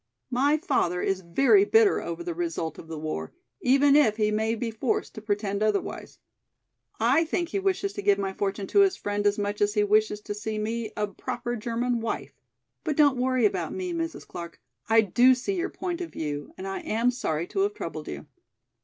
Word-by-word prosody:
My 280 Hz, +5 st, +3 dB
father 180 Hz, -, 0 dB
is 195 Hz, -1 st, 0 dB
very 270 Hz, -, +4 dB
bitter 435 Hz, 0 st, +4 dB
over 170 Hz, 0 st, -5 dB
the 170 Hz, 0 st, -3 dB
result 165 Hz, -1 st, -3 dB
of -, -, -11 dB
the 160 Hz, -1 st, -6 dB
war, 150 Hz, -, -4 dB, 0.3 s
even 275 Hz, +2 st, +5 dB
if 225 Hz, -8 st, +4 dB
he 215 Hz, -1 st, +2 dB
may 220 Hz, +2 st, 0 dB
be 230 Hz, 0 st, -3 dB
forced 225 Hz, +2 st, -1 dB
to 215 Hz, -, -8 dB
pretend 205 Hz, -1 st, -2 dB
otherwise. 215 Hz, -2 st, -1 dB, 0.8 s
I 255 Hz, +9 st, +4 dB
think 340 Hz, +1 st, -2 dB
he 395 Hz, -, -1 dB
wishes 390 Hz, +1 st, 0 dB
to -, -, -5 dB
give 200 Hz, 0 st, +3 dB
my 195 Hz, -1 st, -2 dB
fortune 195 Hz, 0 st, -2 dB
to 405 Hz, -, +2 dB
his 390 Hz, -1 st, +4 dB
friend 205 Hz, 0 st, -1 dB
as 205 Hz, -, +2 dB
much 205 Hz, 0 st, -2 dB
as 205 Hz, +1 st, +2 dB
he 210 Hz, -, +3 dB
wishes 210 Hz, 0 st, +2 dB
to 205 Hz, -, -5 dB
see 215 Hz, +1 st, -4 dB
me 220 Hz, +1 st, -3 dB
a 210 Hz, -, +1 dB
proper 240 Hz, +4 st, -4 dB
German 235 Hz, +2 st, -1 dB
wife. 230 Hz, -, -4 dB, 0.5 s
But 300 Hz, -, -2 dB
don't 285 Hz, -4 st, +5 dB
worry 255 Hz, -2 st, +2 dB
about 185 Hz, -5 st, 0 dB
me, 365 Hz, -2 st, -3 dB
Mrs. 330 Hz, 0 st, -4 dB
Clark, 170 Hz, -1 st, -8 dB, 0.3 s
I 225 Hz, 0 st, +6 dB
do 245 Hz, +5 st, +5 dB
see 265 Hz, +11 st, -3 dB
your 360 Hz, +2 st, -1 dB
point 360 Hz, -1 st, -4 dB
of 345 Hz, -, -5 dB
view 145 Hz, -2 st, -4 dB
and 190 Hz, -, -7 dB
am 220 Hz, +5 st, 0 dB
sorry 170 Hz, -10 st, -2 dB
to -, -, -3 dB
have 405 Hz, +1 st, +1 dB
troubled -, -, -6 dB
you." -, -, -6 dB
220 Hz, 205 wpm, -26 LUFS, 200-280 Hz, 0.8 s, I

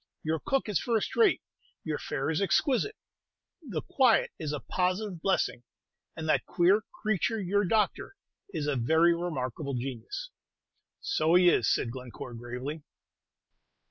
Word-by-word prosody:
Your 160 Hz, 0 st, 0 dB
cook 270 Hz, -3 st, 0 dB
is 210 Hz, -4 st, +1 dB
first 230 Hz, -3 st, -1 dB
rate; 440 Hz, -4 st, +4 dB, 0.4 s
your 155 Hz, -2 st, -2 dB
fare 135 Hz, +4 st, -2 dB
is 160 Hz, -, 0 dB
exquisite; 260 Hz, -, +2 dB, 0.7 s
the 210 Hz, -, -4 dB
quiet 255 Hz, -4 st, +3 dB
is 155 Hz, -2 st, -3 dB
a 150 Hz, -, -2 dB
positive 185 Hz, +1 st, -1 dB
blessing; 190 Hz, -10 st, +1 dB, 0.5 s
and 160 Hz, -1 st, -5 dB
that -, -, +2 dB
queer 185 Hz, +5 st, +4 dB, 0.2 s
creature, 215 Hz, +1 st, +1 dB
your 200 Hz, +1 st, +1 dB
doctor, 215 Hz, -, 0 dB, 0.4 s
is 160 Hz, -6 st, -3 dB
a 145 Hz, -1 st, 0 dB
very 160 Hz, +8 st, +4 dB
remarkable 140 Hz, -5 st, -3 dB
genius." 135 Hz, -, -5 dB, 0.7 s
"So 290 Hz, -, +2 dB
he 180 Hz, 0 st, +7 dB
is," 120 Hz, -, +3 dB
said 115 Hz, -, 0 dB
Glencore, 125 Hz, -1 st, -8 dB
gravely. 125 Hz, +6 st, -6 dB
170 Hz, 140 wpm, -29 LUFS, 140-210 Hz, 0.7 s, he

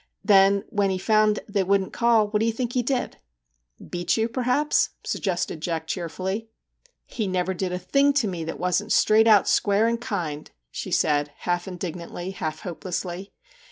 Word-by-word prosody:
* -, -, -53 dB
Then 200 Hz, -1 st, +5 dB
when 200 Hz, -2 st, +1 dB
he 190 Hz, -, -1 dB
found 215 Hz, +1 st, +2 dB
they 205 Hz, -2 st, 0 dB
wouldn't 195 Hz, 0 st, +1 dB
call, 230 Hz, -3 st, +3 dB
what 210 Hz, 0 st, 0 dB
do 225 Hz, -, +1 dB
you -, -, +2 dB
think 245 Hz, +1 st, -3 dB
he 250 Hz, -, +2 dB
did? 245 Hz, +1 st, -2 dB, 0.3 s
' -, -, -48 dB
' -, -, -17 dB
Beat 175 Hz, +4 st, 0 dB
you, 225 Hz, 0 st, +1 dB
perhaps,' 255 Hz, +5 st, +1 dB
suggested 175 Hz, -4 st, -2 dB
Jack 160 Hz, -1 st, -2 dB
cheer 170 Hz, +1 st, -3 dB
fully. 190 Hz, +6 st, -4 dB, 0.3 s
' -, -, -52 dB, 0.2 s
He 215 Hz, -4 st, -3 dB
never 185 Hz, 0 st, -1 dB
did 185 Hz, 0 st, -3 dB
a 180 Hz, -, -2 dB
thing 275 Hz, +10 st, +2 dB
to 275 Hz, -6 st, +1 dB
me 175 Hz, -4 st, -4 dB
that 165 Hz, -, -6 dB
wasn't 180 Hz, +4 st, 0 dB
straight 220 Hz, +1 st, +4 dB
out, 210 Hz, -4 st, +6 dB
square, 205 Hz, +2 st, +3 dB
and 235 Hz, 0 st, -1 dB
kind/ 160 Hz, -10 st, -4 dB, 0.2 s
she -, -, -5 dB
said, 145 Hz, -1 st, +1 dB
half 175 Hz, 0 st, -1 dB
indignantly, 175 Hz, 0 st, -6 dB
half 155 Hz, -5 st, -5 dB
hopelessly. 180 Hz, +1 st, -5 dB
195 Hz, 190 wpm, -24 LUFS, 175-220 Hz, 0.3 s, out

